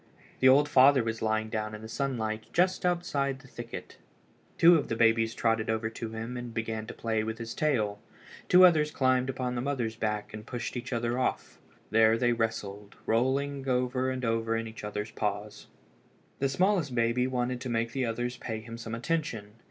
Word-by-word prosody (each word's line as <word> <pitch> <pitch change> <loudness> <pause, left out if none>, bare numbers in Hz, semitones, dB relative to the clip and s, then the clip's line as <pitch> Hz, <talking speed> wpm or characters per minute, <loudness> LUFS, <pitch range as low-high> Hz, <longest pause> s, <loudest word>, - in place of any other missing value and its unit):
The 130 - +6
old 145 +3 +6
father 135 -1 +6
was 115 0 -3
lying 110 0 0
down 110 -1 -3
in 105 - -10
the - - -7
sunlight 110 -4 -2
just 180 +1 +2
outside 145 -6 0
the 135 0 -16
thicket. 120 -2 -8 0.6
Two 170 +1 +7
of 155 - 0
the 115 - -2
babies 115 0 +3
trotted 115 -1 +1
over 110 0 -1
to 115 0 -6
him 115 +2 -5
and 120 -1 -6
began 110 -1 -3
to - - -7
play 110 -1 -1
with 110 +1 -4
his 115 -1 -6
tail. 110 -9 0 0.5
Two 185 +1 +8
others 155 -4 +4
climbed 130 -2 +1
upon 125 -1 -2
the 120 - -2
mother's 125 -5 -2
back 105 -2 -3
and 110 0 -7
pushed 120 0 -5
each 125 +1 -5
other 120 +1 -1
off. 130 - -2 0.3
There 110 +1 +5
they 120 0 +2
wrestled, 105 -3 -3
rolling 135 +4 0
over 125 +1 +1
and 130 -1 -3
over 115 0 0
in 115 0 -3
each 110 -1 -10
other's 105 +1 -4
paws. 105 -1 -4 0.7
The 135 - +1
smallest 175 -3 +1
baby 120 +2 +2
wanted 125 -1 -2
to 130 - -4
make 115 0 -1
the 130 -2 -1
others 120 +2 -3
pay 110 -2 -4
him 115 +1 -9
some 115 -1 -5
attention. 120 -5 -2
120 Hz, 190 wpm, -29 LUFS, 110-130 Hz, 0.7 s, Two